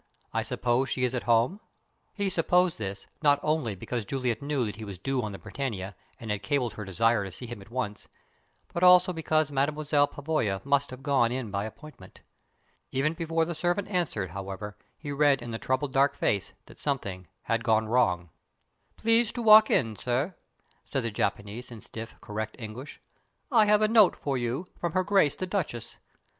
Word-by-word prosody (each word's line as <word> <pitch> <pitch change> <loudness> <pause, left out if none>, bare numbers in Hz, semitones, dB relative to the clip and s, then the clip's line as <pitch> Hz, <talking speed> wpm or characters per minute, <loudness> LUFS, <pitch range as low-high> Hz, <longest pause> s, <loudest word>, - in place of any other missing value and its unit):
I - - +1
suppose 125 +2 0
she 130 - -1
is 125 0 +1
at 125 - -3
home?" 120 - +3 0.6
He 200 -2 -1
supposed 180 -1 +2
this, 100 -2 -4 0.2
not 145 -2 +4
only 150 -9 0
because 115 +5 -4
Juliet 125 +2 -2
knew 140 -3 0
that 105 - -5
he 110 - -7
was 100 -3 -7
due 135 +7 -1
on 105 - -4
the 95 - -7
Britannia, 100 -9 -5 0.2
and 110 -2 -5
had 105 -1 -2
cabled 125 -2 0
her 105 - -6
desire 110 +3 +2
to 95 - -6
see 125 - -7
him 120 -3 -8
at 100 - -14
once, 115 -4 -4 0.7
but 170 - -2
also 180 0 +7
because 155 -2 +1
Mademoiselle 145 +1 +2
Pavoya 140 -11 -1
must 140 0 +2
have 130 +1 -10
gone 135 -5 +3
in 125 -4 -3
by 100 +1 -1
appointment. 150 +7 -12 0.7
Even 140 +4 +1
before 165 0 0
the 170 - -3
servant 175 +5 0
answered, 160 - -1
however, 100 +2 -6 0.2
he 145 -2 -6
read 140 -1 +3
in 120 -1 -7
the 115 - -4
troubled 130 +1 -1
dark 140 +1 +3
face 100 -3 0
that - - -16
something 100 - -3 0.2
had 115 0 0
gone 110 -2 +3
wrong. 90 -8 +1 0.7
"Please 230 0 +3
to 240 - -4
walk 215 0 +8
in, 115 -3 +2
sir," 130 - -1 0.5
said 135 - -2
the 115 - -2
Japanese, 105 +4 -2
in 115 -2 -9
stiff, 115 +2 -8
correct 110 +1 -5
English. 120 +4 -8 0.5
"I 225 -4 +6
have 210 0 +4
a - - +5
note 215 -4 +6
for 140 -2 -2
you 125 +7 -2
from 170 -2 -2
Her 185 0 +2
Grace 190 -7 +3
the 185 - -3
Duchess. 180 - -3
130 Hz, 190 wpm, -28 LUFS, 110-155 Hz, 0.7 s, walk